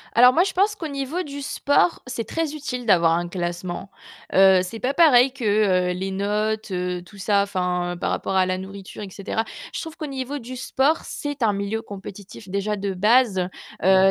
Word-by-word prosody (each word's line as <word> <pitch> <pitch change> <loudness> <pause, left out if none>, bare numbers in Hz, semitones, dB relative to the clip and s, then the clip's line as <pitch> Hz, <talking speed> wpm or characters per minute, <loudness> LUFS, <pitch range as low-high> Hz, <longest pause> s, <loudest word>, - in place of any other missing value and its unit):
Alors, 250 +2 +8
moi, 335 - +4
je 380 0 0
pense 405 +3 +2
qu'au 330 -6 -5
niveau 280 +5 -3
du 285 -2 -7
sport, 285 +4 +1
c'est 230 -2 -3
très 320 +3 -2
utile 270 -5 -4
d'avoir 170 -6 +4
un 175 +1 0
classement. 175 +1 -4 0.4
Heu, 190 -1 +7
c'est 220 +5 -7
pas 260 - 0
pareil 270 -5 +6
que, 265 -4 -7 0.5
heu, - - +1
les 190 +2 -3
notes, 210 +2 -1
heu, 180 0 -2
tout 200 +3 -15
ça, 200 +1 +2
enfin 180 -2 -1
par - - 0
rapport 195 - -2
à 190 -1 +4
la 185 0 -1
nourriture 195 +1 -9
et 195 - -7
cetera. 210 +4 -3 0.3
Je - - -3
trouve 320 -1 -7
qu'au 310 - -5
niveau 270 +1 -4
du 255 +2 -8
sport, 275 +5 +1
c'est 290 -4 -4
un 210 - +3
milieu 200 +2 -2
compétitif 200 -1 -10
déjà 200 +2 -1
de 200 -1 -2
base, 210 -2 +3 0.4
heu, 190 0 +6
210 Hz, 200 wpm, -23 LUFS, 190-265 Hz, 0.5 s, Alors